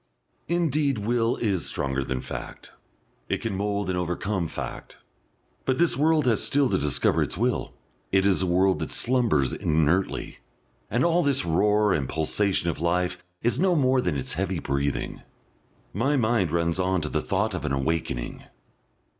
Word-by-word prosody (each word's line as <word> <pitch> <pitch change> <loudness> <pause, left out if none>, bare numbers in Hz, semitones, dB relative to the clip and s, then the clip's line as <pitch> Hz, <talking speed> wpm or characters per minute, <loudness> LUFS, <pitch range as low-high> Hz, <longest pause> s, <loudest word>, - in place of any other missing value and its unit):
Indeed 155 -6 +1
Will 115 +3 +1
is 100 -6 -1
stronger 70 0 -1
than 65 -1 -3
Fact, - - -8 0.6
it - - +1
can 115 -4 -3
mould 100 0 -1
and 95 - -1
overcome 90 +1 -2
Fact. - - -7 0.7
But 130 -1 0
this 170 -5 +3
world 155 +1 +3
has 115 -4 +2
still 140 -2 +2
to - - +3
discover 75 -2 +1
its - - -1
will, - - -1 0.4
it 95 0 +3
is 95 -2 +3
a 95 - 0
world 95 0 +3
that 80 - -3
slumbers 115 - +1
inertly, 80 +4 0 0.5
and 120 - +1
all 170 +1 +3
this 140 - +1
roar 105 +4 +3
and 70 -4 -1
pulsation 85 +4 0
of 85 -2 -2
life 90 +1 0 0.2
is 120 - +1
no 185 0 +3
more 130 -3 +3
than 90 -10 -1
its 65 - -2
heavy - - -1
breathing.... 70 +1 -2 0.7
My 135 +9 +1
mind 110 -7 +2
runs 85 +2 0
on 95 -1 +1
to 75 - -3
the 75 - -1
thought 105 +2 -1
of 90 - -4
an 75 - -2
awakening. 70 -2 -2
95 Hz, 165 wpm, -25 LUFS, 80-120 Hz, 0.7 s, this